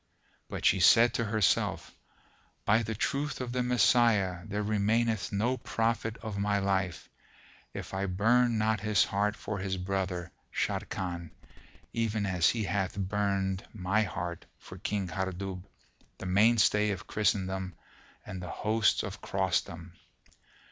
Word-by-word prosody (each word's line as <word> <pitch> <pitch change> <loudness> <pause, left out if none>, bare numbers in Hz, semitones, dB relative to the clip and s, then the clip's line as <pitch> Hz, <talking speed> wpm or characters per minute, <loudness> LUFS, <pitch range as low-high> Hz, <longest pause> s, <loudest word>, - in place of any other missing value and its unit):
But - - -5
she - - +5
said 115 +6 +6
to 115 -3 0
herself, 105 -2 +1 0.7
"By 110 +2 +4
the 110 -1 -3
truth 140 +6 -1
of 125 -2 -4
the 125 0 0
Messiah, 120 -6 +3
there 105 0 -2
remaineth 110 +1 +1
no 115 +6 0
profit 115 -1 -1
of 105 -3 -4
my 100 0 +1
life, 95 -4 -1 0.6
if - - -7
I 95 +1 -1
burn 115 +5 +3
not 110 0 +1
his 105 -1 +3
heart 105 +1 0
for 105 -1 -5
his 95 0 -2
brother, 90 -2 -3 0.2
Sharrkan, 85 -3 -3 0.6
even 110 -2 0
as 90 -3 +3
he 115 -2 -1
hath 95 0 -1
burned 95 -1 -1
my 100 +2 +1
heart 90 -4 -4
for - - -12
King 100 -2 -2
Hardub, 95 +1 -4 0.5
the - - -8
mainstay 105 +2 +4
of 100 - -4
Christendom 95 -3 -1 0.5
and 95 -3 -6
the 90 - -6
hosts 110 0 +1
of 100 0 -6
Crossdom!" 95 -3 -2
100 Hz, 135 wpm, -30 LUFS, 95-110 Hz, 0.7 s, said